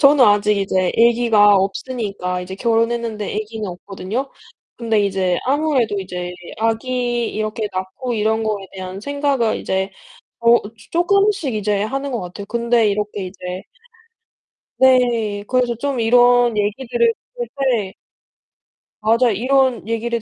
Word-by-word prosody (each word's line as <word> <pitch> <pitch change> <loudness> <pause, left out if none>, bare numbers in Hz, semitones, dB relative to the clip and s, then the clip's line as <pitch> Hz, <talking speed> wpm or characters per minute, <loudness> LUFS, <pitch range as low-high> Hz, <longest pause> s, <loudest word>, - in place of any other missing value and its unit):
저는 280 -2 +6
아직 210 0 +3
이제 190 -2 0
애기가 230 -3 +5
없으니까 195 -2 -2
이제 180 +1 -7
결혼했는데 230 0 -1
애기는 215 0 -4
없거든요. 195 +8 -5 0.5
근데 225 -2 +1
이제 190 -2 0
아무래도 270 -7 +1
이제 180 -1 -5 0.3
아기 240 +1 -1
이렇게 215 0 -3
낳고 190 +7 -4
이런 220 +1 +1
거에 210 -3 -2
대한 185 0 -7
생각을 280 -3 0
이제 190 +1 -2 0.5
어 235 0 +6
쪼 205 - -8 0.2
쪼끔씩 385 - +2
이제 205 -1 0
하는 275 +5 -3
거 240 - -2
같아요. 180 +3 -7
근데 235 +1 +1
이렇게 205 -1 -3
이제 180 0 -7 1.2
네. 240 -6 +3
그래서 250 -2 +1
좀 270 +1 -2
이런 245 0 +4
얘기들을 255 - +1 0.2
들을 485 -1 -4
때 235 -8 0 1.1
맞아요, 230 +3 +3
이런 260 +1 +1
얘기를 230 +1 -2
225 Hz, 290 characters per minute, -19 LUFS, 205-250 Hz, 1.2 s, 저는